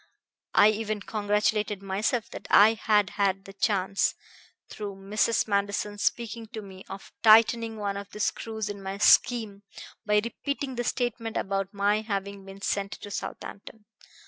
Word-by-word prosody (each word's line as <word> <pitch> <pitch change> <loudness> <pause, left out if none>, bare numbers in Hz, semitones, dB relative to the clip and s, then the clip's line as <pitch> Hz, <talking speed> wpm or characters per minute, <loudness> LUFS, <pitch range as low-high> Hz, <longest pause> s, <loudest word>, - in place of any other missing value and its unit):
I 210 - +7
even 215 -1 -2
congratulated 210 -1 0
myself 210 +4 -1
that - - -8
I 215 +2 +7
had 210 -3 +2
had 195 0 +1
the 195 - -11
chance, 195 -1 +1 0.5
through 205 -2 -6
Mrs. 210 +4 0
Manderson's 205 0 -1
speaking 230 -1 -1
to 220 - -5
me, 190 -1 -11
of 195 - -9
tightening 225 0 +5
one 200 -1 -2
of 200 0 -7
the 210 - -10
screws 220 0 -2
in 205 -1 -6
my 195 0 -5
scheme 220 -2 +4 0.4
by 210 0 +3
repeating 280 +3 -4
the 240 -1 -2
statement 235 -2 -2
about 195 0 -2
my 205 +1 +1
having 200 -2 -4
been 195 0 -11
sent 200 0 -1
to 205 - -9
Southampton." 210 +2 -7
210 Hz, 150 wpm, -27 LUFS, 200-220 Hz, 0.5 s, I